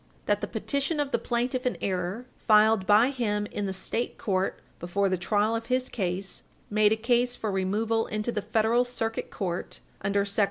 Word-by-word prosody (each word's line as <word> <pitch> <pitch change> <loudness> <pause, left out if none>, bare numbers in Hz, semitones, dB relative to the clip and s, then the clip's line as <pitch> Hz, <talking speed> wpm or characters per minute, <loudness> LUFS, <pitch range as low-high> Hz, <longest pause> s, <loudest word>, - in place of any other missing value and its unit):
That - - +1
the - - -2
petition 280 +2 -1
of 285 -2 -1
the - - +1
plaintiff 245 +1 -1
in 250 - -1
error, 185 +5 -2
filed 215 -2 +4
by 220 +6 +5
him 210 -6 -1
in 205 -1 -2
the - - -2
State 210 +5 -3
court 190 -2 -1 0.2
before 195 +3 0
the 185 - +2
trial 205 +5 +1
of 230 0 -4
his 255 +1 0
case, 190 -2 -3 0.3
made 210 0 +4
a - - +4
case 240 +2 +1
for 215 - -2
removal 215 +4 0
into 215 +2 -2
the 210 - -2
Federal 220 +3 +2
Circuit 225 -2 -3
Court 180 -4 -4 0.2
under 200 0 +1
sect. 200 +2 -4
215 Hz, 190 wpm, -27 LUFS, 195-240 Hz, 0.3 s, by